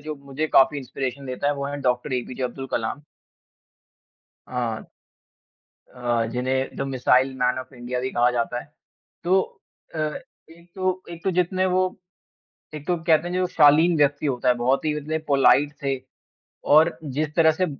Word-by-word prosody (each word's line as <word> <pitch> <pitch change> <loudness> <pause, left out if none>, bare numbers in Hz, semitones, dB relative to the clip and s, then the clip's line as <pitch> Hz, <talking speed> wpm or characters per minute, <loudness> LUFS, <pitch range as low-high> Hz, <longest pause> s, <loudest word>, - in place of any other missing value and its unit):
जो 155 +1 -5
मुझे 140 +2 -4
काफ़ी 140 0 +4
इंस्पिरेशन 135 +1 -5
देता 130 +2 -3
है 145 - +2
वो 140 - -4
हैं 145 0 -5
डॉक्टर 125 +1 0
ए. 125 -1 0
पी. 130 - -7
जे 130 - -5
अब्दुल 135 +2 -4
कलाम। 115 +6 -2 1.5
हाँ। 120 -3 -2 1.1
अ, 120 -2 0
जिन्हें 130 +2 -1
the - - -6
missile 130 0 +2
man 125 0 +1
of 130 +1 -8
India 125 +1 -4
भी 130 +1 -2
कहा 120 +1 +3
जाता 120 0 -2
है। - - -14 0.6
तो 185 +2 +4 0.5
अ, - - -4 0.5
एक 170 +1 -18
तो 185 -1 -1
एक 170 -1 -9
तो 190 - +2
जीतने 180 +1 +1
वो 185 0 +2 0.9
एक 145 -1 -8
तो 180 - +1
कहते 165 0 +3
हैं 180 - -4
जो 185 - +1
वो 185 - +2
शालीन 160 +2 +5
व्यक्ति 145 0 +2
होता 125 -2 0
है, 125 - +5
बहुत 130 +5 +1
ही 150 -1 +1
मतलब 155 +2 -3
पोलाइट 140 +1 +4
थे। 135 -1 0 0.8
और 160 +2 +5
जिस 150 +2 -3
तरह 160 -1 +6
से 185 +4 0
140 Hz, 180 wpm, -24 LUFS, 125-160 Hz, 1.5 s, तरह